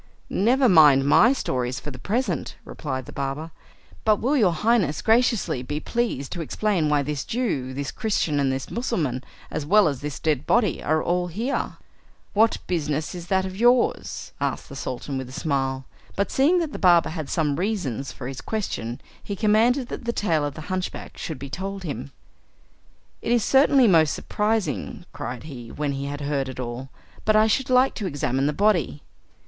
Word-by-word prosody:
"Never 250 +6 +3
mind 150 - +7
my 215 - +6
stories 125 - -2
for 150 - -7
the 130 - -10
present," 235 - -2
replied 130 -4 -5
the - - -10
barber, 140 +4 -4 0.5
"but 215 -1 +4
will 260 +8 0
your 210 -10 +4
Highness 195 -4 +1
graciously 225 - +2
be 145 +4 -3
pleased 225 - -2
to 175 - -4
explain 175 -1 0
why 145 -1 +2
this 145 -1 -3
Jew, 190 - -2
this 135 +1 -4
Christian, 200 -10 0
and 135 -1 +2
this 130 0 -4
Mussulman, 160 - -1 0.3
as - - -2
well 205 +6 +5
as 140 -4 -2
this 145 -2 -4
dead 150 -4 -1
body, 220 -8 +2
are 155 +1 +1
all 180 0 0
here?" 225 +10 -2 0.6
"What 220 +2 +4
business 155 -3 -2
is 175 -1 -7
that 190 0 +1
of 190 0 -6
yours?" 240 +3 +2
asked - - -2
the 140 - -9
Sultan 135 0 -4
with 130 -1 -6
a - - -10
smile; 135 -2 -1 0.3
but 200 - -1
seeing 300 +7 +4
that 320 -3 -2
the - - -6
barber 175 -3 +5
had 155 -3 -5
some 150 -4 0
reasons 170 - -2
for 125 - -7
his 135 -1 -6
question, 125 - -3 0.2
he 200 - -4
commanded 230 +5 +3
that - - -6
the 235 - +1
tale 165 -9 +1
of 145 -1 -3
the - - -7
hunchback 185 +3 -4
should 160 -4 -5
be 140 - -7
told 195 +7 -5
him. 140 - -5 1.1
"It - - -2
is 240 -3 +3
certainly 270 0 +5
most 160 -6 +4
surprising," 210 -4 -2
cried 125 -1 -5
he, 125 -7 -9
when 145 -1 -2
he 140 0 -3
had 145 +1 -5
heard 140 -2 -1
it 130 - -8
all, 125 +2 -5 0.3
"but 215 - +3
I 215 0 +6
should 250 +4 +1
like 255 +1 +4
to 205 - -3
examine 135 -3 0
the - - +2
body." 175 -4 +1
160 Hz, 185 wpm, -24 LUFS, 140-215 Hz, 1.1 s, mind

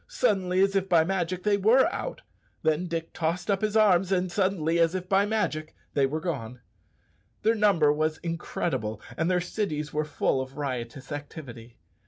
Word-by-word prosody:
Suddenly, 190 - +1
as 195 0 +1
if 195 -1 0
by 170 -3 +5
magic, 180 0 -2
they 210 -1 +3
were 225 +7 +5
out; - - -5 0.4
then 160 +3 +1
Dick 165 -1 -4
tossed 175 +4 -1
up 195 - 0
his 215 0 +1
arms, 195 -3 +4
and 185 -1 +1
suddenly, 175 -4 +1
as 165 +2 +3
if 185 -1 -4
by 195 +1 +3
magic, 160 -8 -2 0.2
they 140 -1 +3
were 155 +4 -2
gone! 130 -8 -4 0.8
Their 220 +2 +4
number 195 -9 +4
was 155 +1 0
incredible, 165 - -3 0.2
and 165 +2 0
their 180 -1 +3
cities 160 -5 -3
were 155 +1 +1
full 150 -3 0
of 130 +1 -8
riotous 130 -1 -5
activity. 140 -5 -8
170 Hz, 175 wpm, -27 LUFS, 150-195 Hz, 0.8 s, by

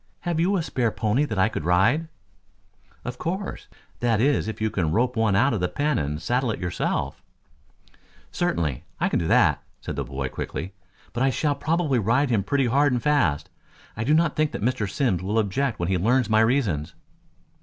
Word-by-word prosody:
Have 175 -2 -1
you 190 +4 +2
a 170 - -1
spare 125 -6 0
pony 110 +6 0
that 110 -8 -4
I 95 +2 +4
could 110 - -4
ride!" 110 - +3 1.0
"Of 120 +1 -5
course. 190 +4 -4 0.3
That 115 -3 +1
is 135 -1 +2
if 110 - -5
you 110 0 0
can 85 -5 0
rope 125 +6 +1
one 110 -3 +2
out 125 +6 +3
of 110 - -1
the 90 - +1
pen 150 - 0
and 75 +1 -2
saddle 125 +6 0
it 110 - -2
yourself." 90 -1 -2 1.1
"Certainly. 75 -7 -1 0.2
I - - +1
can - - +1
do 80 - -2
that," - - +4 0.2
said - - -6
the - - -2
boy 65 -1 -4
quickly. 95 +7 -5 0.4
"But 120 - -3
I 135 - +4
shall 145 +2 0
probably 155 -3 0
ride 125 +6 +2
him 110 -4 +2
pretty 135 +6 +1
hard 140 +4 +3
and 120 -2 -1
fast. 95 - +1 0.4
I 110 - -3
do 150 +6 +3
not 165 -1 +2
think 155 -1 0
Mr. 110 -2 -1
Simms 100 - 0
will 100 +4 -1
object 110 +4 0
when 85 - -2
he 95 -1 +1
learns 115 +3 +2
my 110 - +5
reasons." 110 - 0
115 Hz, 195 wpm, -24 LUFS, 95-140 Hz, 1.1 s, my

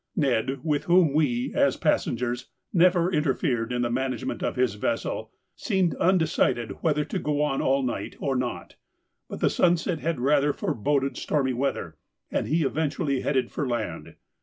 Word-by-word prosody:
Ned, 135 - 0
with 150 -3 0
whom 175 -4 +4
we, 125 -6 +1
as - - +2
passengers, 120 +1 0 0.3
never 180 0 +4
interfered 135 -6 0
in 120 0 0
the 120 - -1
management 130 +1 -2
of - - -1
his 125 -3 +1
vessel, 110 +1 -2 0.3
seemed 190 -6 0
undecided 160 -9 +1
whether 150 -3 +1
to - - -3
go 150 0 0
on 135 -2 0
all 135 +1 +2
night 115 -5 -3
or 135 -1 -1
not, 120 -9 -4 0.5
but - - -7
the - - +4
sunset 175 -1 +2
had 160 -3 -2
rather 145 +2 +3
foreboded 135 +4 -1
stormy 135 -4 0
weather, 120 - -2 0.3
and - - -1
he 160 +1 +2
eventually 145 -1 -1
headed 130 -4 0
for 145 - -2
land. 120 -3 -4
140 Hz, 160 wpm, -26 LUFS, 125-155 Hz, 0.5 s, whom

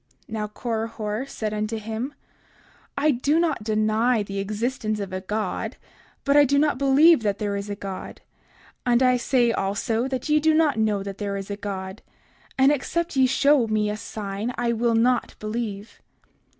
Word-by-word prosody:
30:48 - - -31
Now 210 -1 -2
Korihor 225 +1 -3
said 215 -1 -3
unto 215 +1 -2
him: 225 +6 -5 0.8
I 300 +2 +3
do 285 +5 +1
not 320 -9 0
deny 215 +2 +2
the 200 0 -5
existence 215 +2 -2
of 195 -2 -5
a 185 - -3
God, 205 0 -3 0.5
but 280 0 +3
I 290 - +8
do 280 0 +2
not 290 -3 +2
believe 280 +2 +6
that 205 -2 0
there 205 -2 -2
is 200 +1 -4
a 205 - -3
God; 195 -2 -7 0.6
and 245 +1 +3
I 255 -1 +4
say 240 -1 +2
also, 225 +4 -1
that 260 0 -3
ye 305 0 +4
do 315 +1 +3
not 310 -7 +3
know 210 -2 +1
that 200 0 -7
there 200 -1 -2
is 195 +1 -6
a - - -2
God; 195 -1 -6 0.6
and 270 +1 +5
except 335 +4 -1
ye 260 -1 +5
show 275 -1 +3
me 215 -1 0
a - - -3
sign, 215 +2 -5
I 235 0 +1
will 230 0 +1
not 245 +2 +2
believe. 215 -1 -5
225 Hz, 180 wpm, -24 LUFS, 210-260 Hz, 0.8 s, I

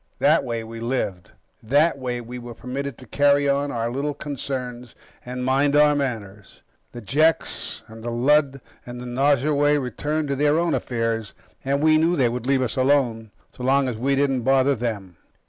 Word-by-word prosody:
That - - +3
way, 115 -3 -3
we 115 +1 -8
lived. 115 -7 -3 0.3
That 145 +7 +2
way, 125 -2 -3
we 120 +1 -8
were 120 -1 -9
permitted 135 +2 -5
to 130 - -13
carry 145 +3 +3
on 140 +1 +1
our 115 0 -2
little 140 +3 -2
concerns, 125 -4 -5 0.3
and 125 0 -5
mind 140 +2 +2
our 150 0 +6
manners. 110 -8 -5 0.3
The 120 - -9
Jeks 155 +9 0
and 110 0 -12
the 120 - -3
Lud 135 +3 +2 0.2
and 120 0 -8
the 125 - -7
Nosurwey 145 +3 +2
returned 145 +3 -2
to 140 - 0
their 145 +2 +2
own 170 -1 +1
affairs, 115 -3 -2 0.3
and 140 +2 0
we 155 0 +5
knew 165 +2 +2
they 130 -6 +2
would 120 +1 -4
leave 135 -1 +2
us 125 - -3
alone 130 -5 +1 0.3
so - - -11
long 135 +1 +3
as 125 - -2
we 135 +5 0
didn't 135 -2 +1
bother 135 +2 +3
them. 105 -7 -4
130 Hz, 180 wpm, -23 LUFS, 120-145 Hz, 0.3 s, our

